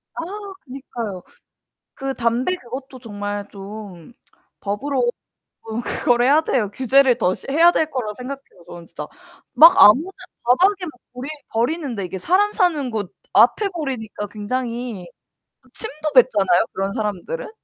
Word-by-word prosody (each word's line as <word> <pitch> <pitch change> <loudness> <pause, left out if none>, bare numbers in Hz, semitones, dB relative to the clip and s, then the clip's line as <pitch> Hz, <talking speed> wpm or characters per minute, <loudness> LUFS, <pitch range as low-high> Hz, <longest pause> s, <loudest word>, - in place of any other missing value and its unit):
아 - - -4 0.4
그니까요. 235 -7 -6 0.7
그 270 -1 -4
담배 245 +9 0
그것도 260 0 -9
정말 205 -3 -5
좀 200 -2 -10 0.5
법으로 240 +4 -1 0.6
좀 225 +1 -4
그거를 240 0 +1
해야 290 +4 +5
돼요. 240 -10 0
규제를 260 0 +3
더 185 -6 +1 0.2
해야 330 +5 +6
될 315 -2 0
거라 235 -7 -3
생각해요 255 -6 -9
저는 170 -1 -10
진짜. - - -8 0.5
막 330 +3 +9
아무나 290 - +7 0.3
바닥에 365 +10 +3
막 315 - -6 0.2
버리 250 +2 -7 0.2
버리는데 240 - -1
이게 185 +1 -6
사람 375 - +2
사는 310 - +1
곳 205 -4 -4 0.2
앞에 420 - +5
버리니까 255 - -5
굉장히 230 -1 -4 0.6
그 - - -27
침도 310 -8 -4
뱉잖아요 205 -8 +4
그런 195 +1 -2
사람들은. 220 - -4
245 Hz, 290 characters per minute, -21 LUFS, 210-285 Hz, 0.7 s, 막